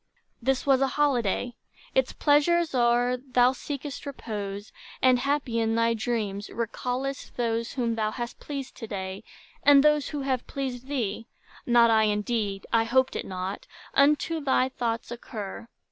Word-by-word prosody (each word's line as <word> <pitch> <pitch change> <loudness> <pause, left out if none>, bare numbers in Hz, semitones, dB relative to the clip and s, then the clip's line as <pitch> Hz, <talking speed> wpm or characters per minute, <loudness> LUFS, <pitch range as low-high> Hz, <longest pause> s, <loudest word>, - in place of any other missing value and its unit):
This 265 +2 0
was 270 -1 +4
a 270 - +4
holiday; 245 -5 +1 0.4
its - - +2
pleasures 315 +3 +3
o'er, 245 0 +3
Thou 250 -1 +3
seek'st 280 +2 -6
repose; 205 -6 -5 0.3
and 255 -1 +4
happy 275 -4 0
in 225 0 +1
thy 230 0 +3
dreams 215 -3 -2
Recallest 250 +4 -3
those 230 -1 -1
whom 235 -3 0
thou 215 -1 0
hast 240 +2 -6
pleased 275 -3 -6
to 225 - -7
day, 190 0 -5 0.4
And 280 -1 +7
those 300 -2 +3
who 295 -2 -4
have 260 -2 -1
pleased 260 -2 -4
thee: 230 -6 -2 0.4
not 235 -1 +6
I, 220 -1 +5
indeed,— 210 -1 -1
I 225 -1 +5
hoped 260 +3 +2
it - - -3
not,—unto 275 - 0
thy 260 -1 +2
thoughts 235 -2 -3
occur. 225 -2 -7
245 Hz, 145 wpm, -27 LUFS, 225-275 Hz, 0.4 s, And